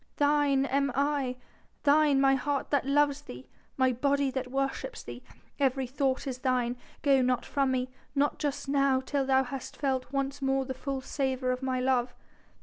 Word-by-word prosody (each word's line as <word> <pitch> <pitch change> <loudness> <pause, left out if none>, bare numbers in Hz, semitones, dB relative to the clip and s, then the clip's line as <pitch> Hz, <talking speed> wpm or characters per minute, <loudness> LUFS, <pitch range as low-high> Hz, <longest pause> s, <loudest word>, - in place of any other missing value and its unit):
Thine 290 -2 +3
am 275 0 +1
I 280 -2 0 0.5
thine 290 -1 +4
my 270 0 +5
heart 275 +1 -1
that 280 -2 +1
loves 290 0 +2
thee 125 - -10 0.3
my 260 -1 +3
body 280 +2 +1
that 260 -1 -3
worships 275 - -3
thee - - -8
my - - -18 0.2
every 270 -1 +1
thought 265 +1 -1
is 255 -2 -4
thine.... 250 -2 0 0.3
Go 275 -3 +4
not 250 -1 +1
from 275 -1 0
me... 255 -1 0 0.3
not 285 +1 +1
just 290 -2 -2
now 275 -1 +3
till 270 0 -1
thou 265 0 +4
hast 265 +1 -7
felt 265 -3 -1
once 275 0 -2
more 270 0 +1
the 260 - -4
full 270 +1 -4
savour 260 -1 -1
of 255 +1 -3
my 260 -1 -1
love." 250 -1 +1
270 Hz, 180 wpm, -29 LUFS, 260-280 Hz, 0.5 s, my